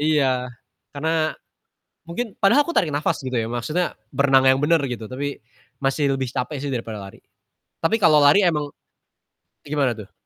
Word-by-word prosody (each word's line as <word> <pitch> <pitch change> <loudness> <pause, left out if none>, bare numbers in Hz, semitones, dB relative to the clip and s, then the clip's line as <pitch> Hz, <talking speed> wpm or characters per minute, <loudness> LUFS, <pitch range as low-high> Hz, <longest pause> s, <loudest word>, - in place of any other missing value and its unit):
Iya, 135 -5 +1 0.4
karena 155 +2 0 0.8
mungkin 215 +5 -4
padahal 235 +9 +5
aku 340 - -4
tarik 165 -5 +3
napas 150 - 0
gitu 130 -1 -3
ya, 110 - -1
maksudnya 150 +9 -2 0.2
berenang 135 -1 +4
yang 130 - +3
benar 165 0 +3
gitu, 115 -2 -5
tapi 140 +2 -4 0.5
masih 135 +2 +1
lebih 130 -2 -2
capek 140 +3 -3
sih 140 - -3
daripada 115 -3 -5
lari. 95 - -12 0.6
Tapi 165 +7 +2
kalau 155 -3 +6
lari 145 +8 +6
emang 150 -4 0 0.9
gimana 140 -4 0
tuh? 100 - -11
145 Hz, 160 wpm, -22 LUFS, 130-160 Hz, 0.9 s, kalau